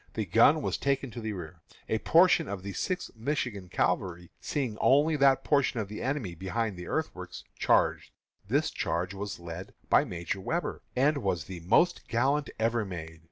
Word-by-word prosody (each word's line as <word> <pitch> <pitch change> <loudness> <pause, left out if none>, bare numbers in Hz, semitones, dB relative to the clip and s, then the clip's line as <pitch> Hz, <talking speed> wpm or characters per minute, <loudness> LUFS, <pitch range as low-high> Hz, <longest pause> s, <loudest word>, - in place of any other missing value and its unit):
The 110 - -1
gun 115 - +5
was - - -1
taken 135 -2 0
to 120 +1 -7
the 110 -1 -3
rear. 85 -2 -8 0.3
A 110 - 0
portion 170 - +5
of 100 -2 -5
the 100 0 -5
Sixth 185 - -3
Michigan 115 -6 -3
Cavalry, 90 -1 -1
seeing 130 -7 -2
only 145 +4 +4
that 135 -1 +4
portion 140 -5 +2
of 105 -3 -3
the 105 - -6
enemy 130 -9 -2
behind 95 +5 -2
the 90 0 -8
earthworks, - - -4 0.2
charged. - - +2 0.4
This - - +1
charge 90 +3 -2
was 100 0 -5
led 85 +2 -8 0.2
by - - +6
Major 90 - -4
Webber, 165 - -2
and 140 +3 +3
was 95 - -1
the 90 +1 -8
most 120 - +2
gallant 135 +5 +1
ever 115 0 +1
made. 80 -4 -7
110 Hz, 175 wpm, -29 LUFS, 90-135 Hz, 0.4 s, by